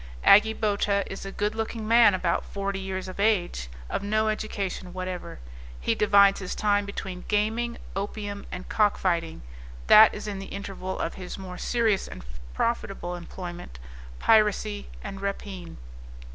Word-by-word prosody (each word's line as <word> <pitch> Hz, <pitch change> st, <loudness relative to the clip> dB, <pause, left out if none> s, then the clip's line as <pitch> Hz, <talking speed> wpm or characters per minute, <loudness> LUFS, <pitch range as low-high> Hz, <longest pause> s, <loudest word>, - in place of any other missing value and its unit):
Agi 220 Hz, +2 st, +6 dB
Bota 200 Hz, -1 st, +1 dB
is 195 Hz, 0 st, -6 dB
a -, -, -6 dB
good 205 Hz, +2 st, -1 dB
looking 225 Hz, 0 st, -4 dB
man, 230 Hz, -3 st, +6 dB
about 180 Hz, -2 st, 0 dB
forty 200 Hz, -1 st, -3 dB
years 190 Hz, -1 st, -4 dB
of 185 Hz, +1 st, -8 dB
age, 180 Hz, -, +1 dB, 0.2 s
of -, -, -2 dB
no 215 Hz, +2 st, +1 dB
education 200 Hz, -4 st, -3 dB
whatever; 185 Hz, -1 st, -5 dB, 0.4 s
he -, -, +1 dB
divides 200 Hz, -1 st, +5 dB
his 185 Hz, -2 st, -4 dB
time 205 Hz, -1 st, +1 dB
between 190 Hz, -2 st, -6 dB
gaming, 225 Hz, +3 st, 0 dB, 0.2 s
opium 205 Hz, 0 st, -4 dB
and 180 Hz, 0 st, -7 dB
cockfighting; 175 Hz, -, +1 dB, 0.4 s
that 215 Hz, 0 st, +9 dB
is 210 Hz, -, -7 dB
in 200 Hz, -2 st, -4 dB
the 195 Hz, -, -7 dB
interval 195 Hz, -2 st, -5 dB
of 165 Hz, -, -2 dB
his 185 Hz, -1 st, -7 dB
more 185 Hz, -2 st, -8 dB
serious 225 Hz, -5 st, +1 dB
and -, -, -10 dB, 0.3 s
profitable 195 Hz, -6 st, -2 dB
employment, 175 Hz, -, -8 dB, 0.4 s
piracy 210 Hz, -, +2 dB
and 195 Hz, -1 st, -7 dB
rapine. 195 Hz, -3 st, -5 dB
200 Hz, 145 wpm, -26 LUFS, 185-210 Hz, 0.4 s, that